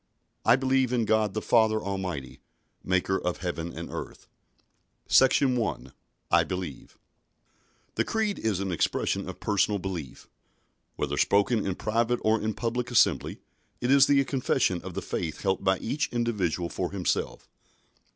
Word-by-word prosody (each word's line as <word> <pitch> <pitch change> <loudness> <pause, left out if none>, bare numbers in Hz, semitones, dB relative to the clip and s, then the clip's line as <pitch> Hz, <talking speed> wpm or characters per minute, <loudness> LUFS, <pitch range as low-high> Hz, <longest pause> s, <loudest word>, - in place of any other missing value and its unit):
I 115 - +6
believe 130 -1 +1
in 120 -3 +1
God 110 -2 +1
the 110 - -2
Father 110 -2 +3
Almighty, 95 -10 -5 0.4
Maker 95 +1 +1
of 90 0 -2
heaven 85 -2 -4
and - - -7
earth_ - - -7 0.8
SECTION 130 0 +4
1. 105 - -3 0.4
I - - +5
BELIEVE 90 -7 -6 1.0
The - - +1
Creed 220 -2 -1
is 110 -4 0
the 95 0 -2
expression 85 - -1
of - - -8
personal 105 0 +1
belief. 90 -9 -6 0.7
Whether - - -2
spoken 105 +2 +2
in 95 -2 -2
private 115 +4 0
or 110 0 +2
in 110 - -1
a - - -2
public 120 +1 -2
assembly, 120 -4 +2 0.4
it 125 +1 0
is 140 0 +6
the 140 -1 +4
confession 125 -9 0
of 95 -1 -8
the - - -3
faith 80 -3 -4
held 95 -1 0
by 95 -1 +3
each 140 +10 -2
individual 105 -8 -1
for - - -3
himself. - - -2
105 Hz, 150 wpm, -27 LUFS, 95-120 Hz, 1.0 s, I